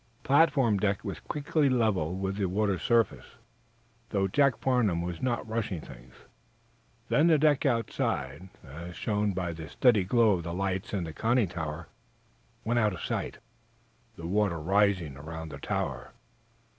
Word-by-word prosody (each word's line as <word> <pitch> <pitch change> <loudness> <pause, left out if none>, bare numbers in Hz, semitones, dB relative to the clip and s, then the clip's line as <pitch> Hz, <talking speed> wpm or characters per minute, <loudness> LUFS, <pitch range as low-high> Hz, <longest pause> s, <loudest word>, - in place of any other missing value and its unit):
The - - -14
platform 140 -8 +4
deck 100 -1 0
was - - -5
quickly 150 0 0
level 105 -10 +1
with 95 +1 -3
the 100 - 0
water's 100 -1 0
surface, 115 0 +1 0.7
though 95 -2 +1
Jacob 140 +5 +2
Farnum 110 -10 +1
was 85 -1 -5
not 120 -3 -1
rushing 110 -5 -2
things. - - -13 0.9
Then 155 +3 +4
the 160 -2 +5
deck 150 -1 +3
outside, 95 - -2
as 85 +4 -9
shown 105 -1 0
by 90 -2 -2
the 80 -2 -8
steady 115 - +3
glow 115 +3 +4
of 90 -3 +1
the 85 +1 -4
lights 95 0 -2
in 100 -4 -1
the 80 -1 -6
conning 115 -1 +1
tower, 80 -1 -5 0.8
went 120 +2 +2
out 105 -3 +2
of 85 - -7
sight, - - -3 0.8
the 85 - -9
water 95 -1 +1
rising 95 -4 +1
around 80 +2 -7
the - - -8
tower. - - -3
100 Hz, 155 wpm, -29 LUFS, 85-115 Hz, 0.9 s, the